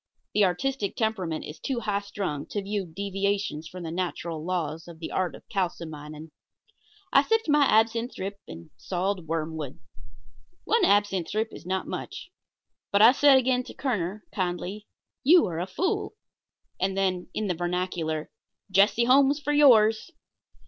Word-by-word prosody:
The 210 - +4
artistic 205 +4 -1
temperament 190 -8 -2
is 150 - -9
too 255 -3 -2
high 205 -2 0
strung 195 -8 -4
to 205 - -3
view 200 -1 -3
such 160 - -19
deviations 195 -4 -2
from 180 +1 -9
the 165 - -5
natural 170 -2 -3
laws 165 -2 -3
of 170 -2 -11
the 160 - -7
art 185 -2 -1
of - - -16
kalsomining. 160 -5 -4 0.8
I - - +7
sipped 450 -2 +1
my 295 -1 +5
absinthe 230 +2 +2
drip 200 +1 -5
and 80 0 -11
sawed 185 -1 -2
wormwood. 160 -3 -3 0.9
One 460 +2 +2
absinthe 200 -4 +2
drip 220 +1 -1
is 170 - -11
not 190 0 -1
much 365 - -7 0.6
but 200 +1 +5
I 230 - +10
said 275 0 +6
again 255 -1 +2
to - - -11
Kerner, 210 -6 -2
kindly: 185 +2 -3 0.4
"You 335 +6 +6
are 165 -2 -3
a 180 - -2
fool." 370 - -2 0.6
And 190 +1 0
then, 185 -2 0
in 215 - -1
the 185 - 0
vernacular: 175 -3 -2 0.4
"Jesse 200 +4 +4
Holmes 275 +3 +5
for 295 0 -1
yours." 225 -5 +5
195 Hz, 155 wpm, -26 LUFS, 170-220 Hz, 0.9 s, I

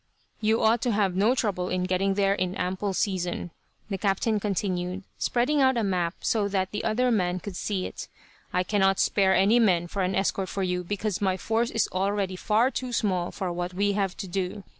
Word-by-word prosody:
"You 220 +1 +2
ought 225 +1 +4
to 245 - +1
have 200 -3 +1
no 215 +7 +3
trouble 190 -7 -1
in 185 0 -1
getting 190 +1 +1
there 195 -1 +3
in 185 -1 -2
ample 190 +1 -2
season," 180 -3 -2 0.4
the 195 -3 -4
captain 205 +2 +1
continued, 185 -2 -2 0.2
spreading 275 +5 +1
out 260 -2 +4
a 230 - +1
map 180 -3 0
so 210 -3 +1
that 190 -2 -1
the 210 - -3
other 245 +3 +1
man 185 -4 +1
could 195 0 -7
see 190 0 -2
it. - - -7 0.4
"I 180 - +1
cannot 195 -1 +2
spare 190 -2 +3
any 200 +6 +4
men 180 -7 +3
for 195 +3 -3
an 185 0 0
escort 190 -1 0
for 195 - -2
you, 180 -1 -1
because 205 +2 -3
my 190 -2 +1
force 225 +4 0
is 225 - +1
already 195 0 0
far 225 +6 +2
too 255 -2 -4
small 185 -7 0
for 185 -3 -4
what 175 +1 -4
we 200 +2 +2
have 195 -2 -1
to 195 - -5
do. 190 +2 -3
195 Hz, 205 wpm, -26 LUFS, 185-215 Hz, 0.4 s, ought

